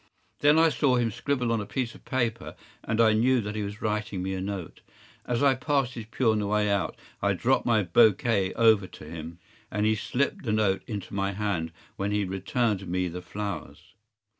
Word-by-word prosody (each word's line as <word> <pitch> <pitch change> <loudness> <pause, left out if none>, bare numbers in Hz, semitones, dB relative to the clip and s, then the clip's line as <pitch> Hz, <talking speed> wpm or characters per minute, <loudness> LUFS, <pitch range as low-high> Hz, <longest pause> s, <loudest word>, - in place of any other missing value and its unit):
Then 150 +2 +5
I 165 0 +6
saw 140 -4 +2
him 120 -2 +1
scribble 125 +1 -1
on 115 -2 +1
a - - -5
piece 125 -3 -2
of - - -17
paper, 120 -4 -2 0.3
and 110 0 -2
I 110 -1 +6
knew 125 +4 +3
that 105 0 -4
he 110 - -3
was 105 +1 -6
writing 105 -3 -2
me 95 0 -2
a 95 - -3
note. 95 -3 -5 0.5
As 120 +2 0
I 140 -1 +6
passed 130 -1 0
his 115 -3 -7
pew 115 0 +1
on 110 - +1
the 105 - -1
way 105 0 +1
out 100 -4 -1 0.2
I - - +2
dropped - - +1
my 110 -3 +3
bouquet 100 +1 +3
over 110 -4 +4
to 85 - -12
him, 80 +1 -8 0.3
and 105 0 -1
he 110 - +4
slipped 125 +5 -1
the 110 -4 -1
note 105 -3 +2
into 105 -4 -6
my 100 0 -1
hand 95 -5 -2 0.3
when 100 +1 -1
he 105 -1 +1
returned 100 +1 -1
me 90 +1 -1
the 90 +2 -6
flowers. 90 -7 -6
105 Hz, 210 wpm, -27 LUFS, 95-120 Hz, 0.5 s, I